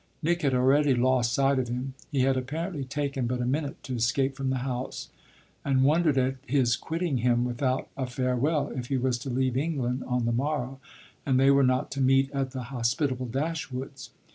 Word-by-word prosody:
Nick 170 +2 +1
had 135 -3 +2
already 135 +2 +4
lost 125 -1 +2
sight 135 +2 +2
of 125 - -1
him 125 +3 -4 0.2
he 140 -3 +1
had 135 +1 +3
apparently 150 +4 -3
taken 140 -1 -2
but 125 +1 -2
a 120 - -1
minute 140 +3 -1
to 130 - -5
escape 130 +3 +1
from 135 -1 -2
the 130 - 0
house; 125 -1 -4 0.5
and 135 -1 +2
wondered 155 0 +3
at 130 +1 +1
his 125 -3 +2
quitting 165 -2 -2
him 120 0 +2
without 130 +2 -1
a 130 -2 -3
farewell 130 +4 0
if 125 -2 -5
he 135 - 0
was 125 -1 0
to 135 - -6
leave 130 0 0
England 135 -4 -1
on 125 -1 0
the 120 - +1
morrow 135 +1 -2 0.4
and 130 -2 +2
they 135 +1 +6
were 140 0 +5
not 130 +2 +1
to 140 - -2
meet 135 +1 +3
at 135 -2 -1
the 130 -1 -5
hospitable 130 +1 0
Dashwood's. 135 0 -4
130 Hz, 195 wpm, -27 LUFS, 125-140 Hz, 0.5 s, they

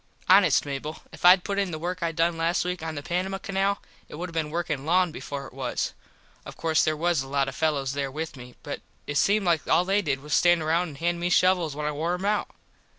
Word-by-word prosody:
Honest, 185 -7 +5
Mable, 145 +2 -5
if - - -12
Id 180 +1 +7
put 200 -1 -2
in 195 -2 0
the 160 - -4
work 180 +3 -4
I 170 -1 0
done 165 +1 +1
last 165 +2 0
week 180 -1 -3
on 160 -1 -4
the 145 - -5
Panamah 185 +4 -2
Canal 195 +1 0 0.3
it - - -8
would 175 +3 -5
have - - -12
been 160 -2 -1
workin 155 -4 -2
long 180 +2 +2
before 140 -2 -6
it - - -12
was. - - -2 0.5
Of - - -10
course 160 -1 +2
there 155 0 0
was 170 -2 +1
a 135 - -7
lot 135 0 0
of - - -4
fellos 140 -4 0
there 140 -1 -2
with 155 +3 -5
me 125 -1 -12
but 145 - -5 0.2
it 145 0 0
seemed 205 0 +2
like 170 -3 +1
all 180 - +3
they 195 +2 +2
did 140 -7 -2
was 150 +1 -10
to - - +5
stand 175 -2 +3
round 170 +3 +1
and 145 -4 -10
hand 170 +2 -1
me 175 +1 -1
shovels 180 -4 +3
when 150 0 -4
I 150 - 0
wore 160 +4 -1
em 185 +2 -5
out. 210 0 0
165 Hz, 260 wpm, -26 LUFS, 150-180 Hz, 0.5 s, Id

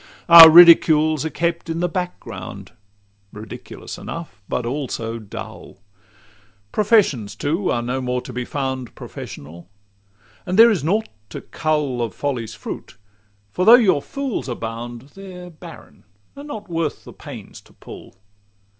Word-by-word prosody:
XCV - - -23 0.2
Our 165 - +12
ridicules 160 -3 +6
are - - -1
kept 170 +1 -3
in 165 0 -3
the 180 - 0
back 180 0 -4
ground - - -10 0.6
Ridiculous 105 +1 -10
enough, 165 - -9
but 120 - -2
also 120 -3 -4
dull; 105 -3 -10 0.9
Professions, 200 - +1
too, 165 +7 -2
are 120 - -1
no 125 +2 -3
more 125 0 -2
to - - -10
be 125 - -3
found 130 -2 -5
Professional; 85 +5 -10 0.7
and 185 +2 -3
there 230 +1 +8
is 190 -10 -1
nought 210 +8 0 0.2
to - - -8
cull 150 -6 -2
Of 115 - -4
folly's 125 -6 -4
fruit; - - -9 0.5
for 180 - -2
though 225 +5 +9
your 190 - +3
fools 275 - -5
abound, 120 +2 -7
They're 180 -2 -11
barren, 165 +1 -14 0.3
and 285 +1 -10
not 215 -8 -8
worth 165 -3 -3
the - - -13
pains - - -11
to - - -23
pull. - - -13
155 Hz, 145 wpm, -20 LUFS, 125-180 Hz, 0.9 s, Our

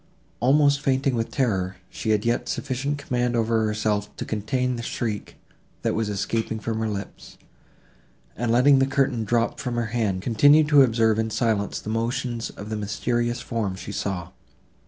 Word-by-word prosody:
Almost 140 +3 +4
fainting 135 -1 +1
with 115 -1 -1
terror, 95 -8 0 0.2
she 110 - -4
had 105 0 +2
yet 120 +1 0
sufficient 140 +1 -2
command 125 -3 -1
over 115 -1 +1
herself, 105 -1 -1
to - - -5
check 125 +4 -1
the 120 - -4
shriek, 115 -2 -4 0.5
that - - +1
was 110 -1 -1
escaping 110 +2 -2
from 110 0 -3
her 110 -1 -1
lips, 100 -1 -7 1.0
and, 120 0 -1
letting 135 +3 +5
the 135 - +3
curtain 135 -4 +1
drop 115 +2 0
from 125 -2 -3
her 115 -2 -2
hand, 100 -6 0
continued 145 +6 +5
to 145 -2 +7
observe 115 -3 +3
in 110 0 0
silence 110 -2 0
the 110 - -6
motions 115 +1 -2
of 105 +2 -9
the 110 - -2
mysterious 120 +4 -1
form 110 -6 -2
she 95 - -7
saw. 95 -4 -3
115 Hz, 170 wpm, -24 LUFS, 105-125 Hz, 1.0 s, to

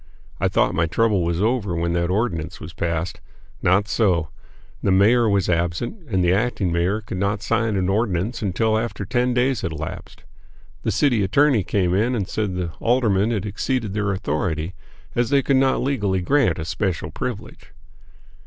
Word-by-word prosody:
I - - +2
thought - - +2
my 80 - +1
trouble 105 +1 +2
was 85 +3 0
over 110 -6 0
when 85 0 -1
that 85 0 0
ordinance 90 -5 -1
was 80 +1 -9
passed. 85 +1 -3 0.4
Not 95 +4 +3
so; 90 -9 +1 0.5
the - - 0
mayor 110 +5 +4
was 100 -2 +1
absent, 85 - -2
and 95 -4 +1
the 90 +1 +3
acting 100 -3 0
mayor 90 +6 0
could 95 -3 -6
not 100 +2 -1
sign 115 -2 0
an 95 -2 0
ordinance 105 +2 0
until 110 +2 +1
after 115 -3 -4
ten 125 +3 0
days 125 -2 +1
had 85 - -3
elapsed. 80 +1 -7 0.6
The - - -1
city 125 -7 +2
attorney 135 +4 +3
came 90 -1 0
in 115 +6 +1
and 100 -5 -2
said 105 -4 -2
the 90 -2 -3
aldermen 115 -4 +2
had 110 -5 -1
exceeded 105 +1 -2
their 105 -1 0
authority, 85 -2 -2 0.4
as 120 -1 0
they 140 -1 +3
could 135 - +3
not 130 -1 +2
legally 105 -9 0
grant 125 - +2
a 80 - -4
special 90 +1 -2
privilege. - - -6
100 Hz, 175 wpm, -22 LUFS, 90-115 Hz, 0.6 s, mayor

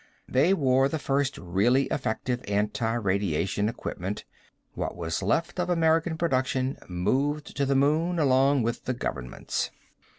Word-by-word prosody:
They 140 +8 +3
wore 135 -3 +3
the 160 - -1
first 140 -1 0
really 100 +10 +2
effective 125 0 -2
anti 105 +3 0
radiation 100 -2 0
equipment; 105 -4 -5 0.5
what - - -3
was 80 0 -2
left 165 - 0
of 180 0 0
American 165 -1 +2
production 130 -4 0
moved 135 +12 -1
to 140 -1 0
the 140 - +2
moon 155 +6 +2
along 135 -2 +3
with 115 +1 -2
the 130 - 0
governments. 65 - -3
130 Hz, 135 wpm, -27 LUFS, 105-145 Hz, 0.5 s, They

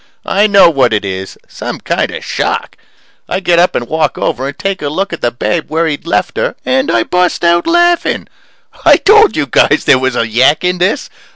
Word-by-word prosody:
I 205 +2 +2
know 200 -3 +6
what 135 -8 +2
it 105 -1 -1
is 95 0 -6
some - - -7
kind - - -2
of - - -8
shock. - - -3 0.5
I - - -1
get 175 -3 +2
up 180 - +2
and 120 - -2
walk 155 0 -1
over 130 +2 -2
and 140 - -7
take 195 -1 -3
a 145 - -2
look 190 +5 -3
at 170 - -6
the 120 - +1
babe 150 +7 -2
where 160 +2 0
he'd 155 0 -4
left - - -1
her - - -1
and 265 +1 0
I 115 - +2
bust 180 +3 -1
out 170 0 +2
laughing. 345 0 +1 0.6
I - - +6
told 430 +1 +4
you - - 0
guys - - +2
there 130 - +4
was 130 -1 -1
a 115 - 0
yak 125 +8 +2
in 180 0 -1
this. 195 +10 -1
170 Hz, 215 wpm, -12 LUFS, 130-195 Hz, 0.6 s, know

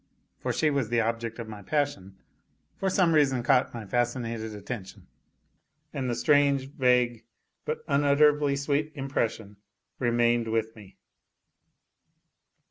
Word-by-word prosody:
(for - - -2
she 155 -1 +1
was 135 -6 -1
the 120 0 +1
object 115 0 -2
of 115 -2 -6
my 105 -2 -9
passion) 120 -7 -2 0.6
for 195 - -1
some 180 -3 +3
reason 135 -5 +3
caught 130 0 +3
my 115 -3 -7
fascinated 115 -1 -2
attention; 105 -2 -8 0.9
and 135 -4 -2
the 120 - -1
strange 140 +1 +2
vague, 125 -4 +2 0.4
but 155 - -3
unutterably 145 0 +3
sweet 145 +2 -1
impression 115 -7 -3 0.4
remained 120 -1 +2
with 110 0 -1
me. 100 -3 -15
125 Hz, 125 wpm, -27 LUFS, 115-140 Hz, 0.9 s, some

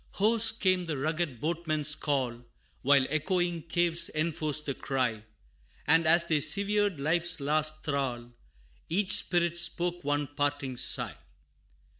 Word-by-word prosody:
Hoarse 225 +2 +3
came 185 -4 0
the 155 -4 -3
rugged 155 -2 -2
Boatman's 155 -1 -1
call, 130 -6 -2 0.4
While 140 0 +4
echoing 175 +2 0
caves 170 +1 +1
enforced 155 -2 -1
the 140 - -2
cry 125 -6 -2 0.6
And 165 +2 +3
as 170 +1 +5
they 160 -3 0
severed 200 -1 0
life's 170 +4 0
last 155 +2 -1
thrall, 130 -5 -3 0.6
Each 195 +4 +2
Spirit 170 -1 0
spoke 175 0 -1
one 145 +1 0
parting 145 -2 -2
sigh. - - +3
155 Hz, 125 wpm, -29 LUFS, 145-175 Hz, 0.6 s, as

